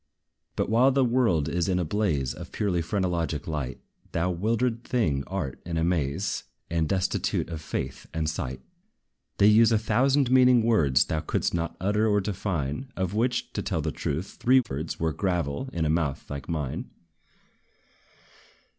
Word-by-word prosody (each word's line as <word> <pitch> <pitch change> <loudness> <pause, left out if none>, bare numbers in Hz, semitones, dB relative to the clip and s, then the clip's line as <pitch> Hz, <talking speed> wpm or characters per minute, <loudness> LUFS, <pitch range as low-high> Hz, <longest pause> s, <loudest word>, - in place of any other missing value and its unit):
But, - - 0
while 120 +4 +5
the 135 -1 +3
world 115 - +2
is 85 +2 0
in 90 - +2
a 90 - 0
blaze 80 -8 0
Of - - -9
purely 95 -5 0
phrenologic 85 -4 -1
light, 75 -5 -4 0.3
Thou, 85 +2 +1
wildered 115 +6 0
thing, 80 - 0
art 90 -9 -4
in 85 -1 -3
a 80 - +1
maze, 85 +2 0 0.3
And 80 -2 0
destitute 95 -2 0
of 80 -2 -5
faith 65 -3 -5
and 80 -1 -2
sight. 65 -4 -3 0.8
They 100 - +5
use 110 +2 +6
a 110 - +4
thousand 130 +4 +2
meaning 125 -2 +6
words 80 - +3
Thou 80 - -1
couldst - - -1
not 85 0 -2
utter 105 +4 +1
or 105 -1 +3
define, 95 - -3
Of 95 0 -2
which, 120 +3 0
to - - -2
tell - - -1
the - - -1
truth, 80 +7 -4
three 130 +2 +5
thirds 75 - -5
Were 80 -1 0
gravel, 90 - -1
in 80 -2 -1
a - - +1
mouth 80 -4 -1
like 70 -2 -5
thine. 75 -5 -3
90 Hz, 165 wpm, -27 LUFS, 80-110 Hz, 0.8 s, use